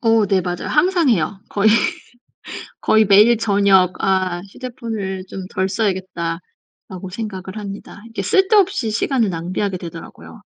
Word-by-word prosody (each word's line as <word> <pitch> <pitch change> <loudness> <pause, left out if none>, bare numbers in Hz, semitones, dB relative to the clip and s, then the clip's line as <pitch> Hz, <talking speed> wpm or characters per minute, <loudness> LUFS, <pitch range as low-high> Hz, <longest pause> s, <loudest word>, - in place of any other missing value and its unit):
어 225 -2 +3
네, 195 -1 +2
맞아요. 175 -1 -4
항상 345 0 +2
해요. 195 -3 0
거의 205 +1 +2 1.1
거의 220 0 +4
매일 210 +4 +6
저녁 200 -4 +3
'아 185 -2 +1
휴대폰을 220 -6 -5
좀 190 0 -7
덜 190 -1 -1
써야겠다.'라고 185 -2 -5
생각을 195 -1 -6
합니다. 205 0 -8
이게 225 -3 -5
쓸데없이 380 - +2
시간을 230 +1 +1
낭비하게 185 +3 -3
되더라고요. 170 -2 -10
200 Hz, 305 characters per minute, -19 LUFS, 185-225 Hz, 1.1 s, 매일